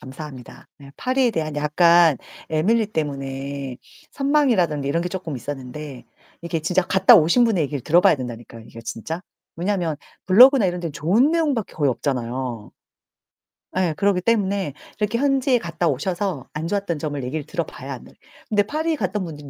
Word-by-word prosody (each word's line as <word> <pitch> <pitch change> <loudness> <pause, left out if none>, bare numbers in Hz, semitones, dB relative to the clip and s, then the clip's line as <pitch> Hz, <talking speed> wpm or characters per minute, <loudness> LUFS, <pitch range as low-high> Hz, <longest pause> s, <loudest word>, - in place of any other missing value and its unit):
감사합니다. 130 -2 -10
네 140 -1 -13
파리에 255 -1 +1
대한 155 -4 -2
약간 165 +1 +4 0.3
에밀리 210 +9 +2
때문에 140 - -4 0.4
선망이라든지 240 - +1
이런 165 +4 0
게 180 - -2
쪼끔 170 -6 -5
있었는데 135 +1 -7 0.3
이게 170 -1 -3
진짜 180 +4 +1
갔다 190 +5 +6
오신 175 +8 +4
분의 215 -8 +2
얘기를 145 0 -4
들어 170 +7 +4
봐야 - - +5
된다니까요, 120 -3 -8
이게 115 - -11
진짜. 115 +9 -5 0.4
왜냐면 175 -3 -1 0.3
블로그나 245 +6 +7
이런 175 -1 -2
데는 165 -3 -4
좋은 190 - +2
내용밖에 295 - 0
거의 145 -3 +1
없잖아요. 125 -3 -3 1.1
예 180 -4 +1
그러기 200 -2 +2
때문에 200 - 0 0.3
이렇게 210 +2 0
현지에 270 -1 +2
갔다 170 -4 -2
오셔서 170 0 -2
안 155 +2 -4
좋았던 195 -4 -2
점을 145 -2 -3
얘기를 145 +5 -3
들어 - - -2
봐야 - - -8
안 - - -9
돼. - - -16 0.4
근데 210 -2 +3
파리에 315 +8 -1
갔던 195 - -2
분들은 150 -4 -9
165 Hz, 390 characters per minute, -22 LUFS, 140-205 Hz, 1.1 s, 블로그나